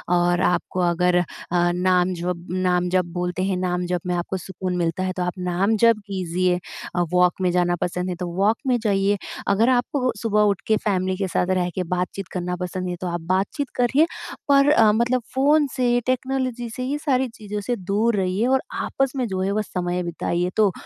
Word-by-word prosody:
और 175 0 +2
आपको 180 +1 0
अगर 180 +1 +2 0.3
अ, 175 0 +3
नाम 180 0 +2
जप 175 0 -4
नाम 180 -1 +1
जप 185 0 +2
बोलते 180 +1 -2
हैं 190 -1 0
नाम 180 -1 -1
जप 180 -1 -1
में 180 - 0
आपको 175 +2 -2
सुकून 185 0 -4
मिलता 170 +1 -1
है 185 - -1
तो 180 - 0
आप 180 - -2
नाम 195 +5 +2
जप 230 -2 +6
कीजिए 180 -1 0 0.4
अ, 175 - +2
वॉक 180 0 +4
में 180 - +2
जाना 175 0 +2
पसंद 180 +1 -2
है 180 - -2
तो 180 +1 -4
वॉक 210 +4 +2
में 250 -1 +3
जाइए। 200 -2 +1 0.3
अगर 220 +5 +3
आपको 255 +1 +1
सुबह 210 -2 +2
उठ 200 - -4
के 220 - +3
फ़ैमिली 185 -2 +1
के 195 0 -1
साथ 180 0 0
रह 180 0 0
के 185 - -1
बातचीत 180 +2 -3
करना 180 -1 -2
पसंद 180 0 -4
है 180 - -2
तो 185 - -2
आप 170 -1 -3
बातचीत 205 +9 0
करिए। 265 +6 +3 0.4
पर 280 +1 +5
अ, 225 -7 +6
मतलब 235 +3 +1
फ़ोन 290 +2 +4
से 245 -2 +2
टेक्नोलॉज़ी 255 -2 -1
से 255 - -4
ये 280 +3 -1
सारी 265 -4 +1
चीज़ों 210 -1 -5
से 245 +4 -1
दूर 210 +4 0
रहिए। 190 +3 0
और 265 0 +3 0.2
आपस 270 -1 0
में 255 -3 -1
जो 190 -2 -2
है 190 +1 0
वो 215 +1 +1
समय 180 -2 -2
बिताइए। 175 +1 -1
तो 210 -3 +4
185 Hz, 205 wpm, -23 LUFS, 180-230 Hz, 0.4 s, जप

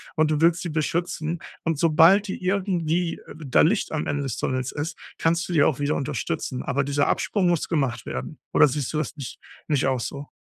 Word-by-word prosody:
und 155 -1 +3
du 155 0 0
willst 170 +1 +4
sie 175 - -3
beschützen 165 +1 -2 0.2
und 165 -3 -1
sobald 165 +6 +5
die 190 - -5
irgendwie 180 -3 0 0.2
da 140 -5 +2
Licht 195 +7 +2
am 155 - -2
Ende 145 0 -1
des 135 -4 -3
Tunnels 130 0 -2
ist, 160 +3 -4 0.2
kannst 170 +1 +1
du 175 - -4
die 150 - +5
auch 145 -2 +2
wieder 145 +1 0
unterstützen, 145 -1 -3
aber 140 +1 0
dieser 145 +1 +1
Absprung 195 -4 +1
muss 175 -3 +1
gemacht 135 -8 -1
werden 65 - -5
oder - - +6
siehst 140 -1 -2
du 155 - -2
das 155 - -2
nicht 140 -4 -7 0.3
nicht 145 -3 +2
auch 130 -2 +1
so? 140 +4 -5
155 Hz, 205 wpm, -24 LUFS, 140-170 Hz, 0.3 s, oder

